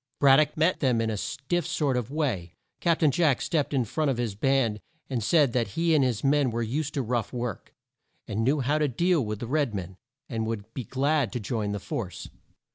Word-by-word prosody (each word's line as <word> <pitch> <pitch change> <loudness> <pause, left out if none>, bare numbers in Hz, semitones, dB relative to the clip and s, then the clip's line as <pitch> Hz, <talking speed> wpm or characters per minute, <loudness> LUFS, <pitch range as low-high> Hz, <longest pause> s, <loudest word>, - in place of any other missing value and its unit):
Brad 135 -1 +7
dock 155 0 +1
met 165 +4 +2
them 125 -5 +2
in 115 -1 0
a - - -2
stiff 145 - -2
sort 150 -6 0
of 125 -2 -2
way. 120 - -2 0.2
Cap 170 -1 +1
tain 155 -3 +5
Jack 155 -5 +2
stepped 150 -4 0
in 130 -4 +1
front 155 +6 -1
of 130 - 0
his 120 -4 -1
band 115 -1 +1 0.3
and 120 -4 -1
said 145 0 +3
that 120 -2 +1
he 165 0 +3
and 150 -3 +4
his 120 -4 0
men 140 -1 +3
were 115 0 -2
used 145 +6 -2
to 140 - 0
rough 120 -1 -1
work, 120 -4 -5 0.5
and 105 +2 -1
knew 140 +4 +2
how 145 +4 +1
to 150 - +2
deal 170 +4 +2
with 105 -1 -3
the 120 - -5
red 140 -3 0
men, 95 -1 -6 0.3
and 110 -2 -2
would 110 -1 -5
be 130 - -5
glad 140 0 +1
to 125 - -2
join 105 -1 -2
the 105 - -3
force. 95 -2 -5
130 Hz, 225 wpm, -27 LUFS, 115-150 Hz, 0.5 s, Brad